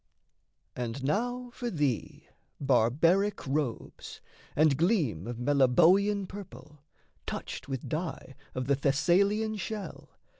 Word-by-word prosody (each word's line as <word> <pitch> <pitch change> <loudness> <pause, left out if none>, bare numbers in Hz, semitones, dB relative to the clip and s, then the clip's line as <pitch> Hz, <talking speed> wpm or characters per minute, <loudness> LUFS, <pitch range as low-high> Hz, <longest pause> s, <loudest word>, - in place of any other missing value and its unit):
And 125 +2 -4
now 245 - -1
for 245 -1 -4
thee 145 - -2 0.3
barbaric 155 - +2
robes, 135 -4 -3 0.4
and 155 -2 +4
gleam 150 - +1
Of 120 -1 -5
Meliboean 165 - +3
purple, 150 -7 -11 0.5
touched 130 - -5
with 135 -2 -4
dye 160 -4 -4 0.2
Of 130 0 -2
the 140 - +2
Thessalian 195 +11 +2
shell... 210 +1 -6
150 Hz, 105 wpm, -29 LUFS, 130-200 Hz, 0.5 s, and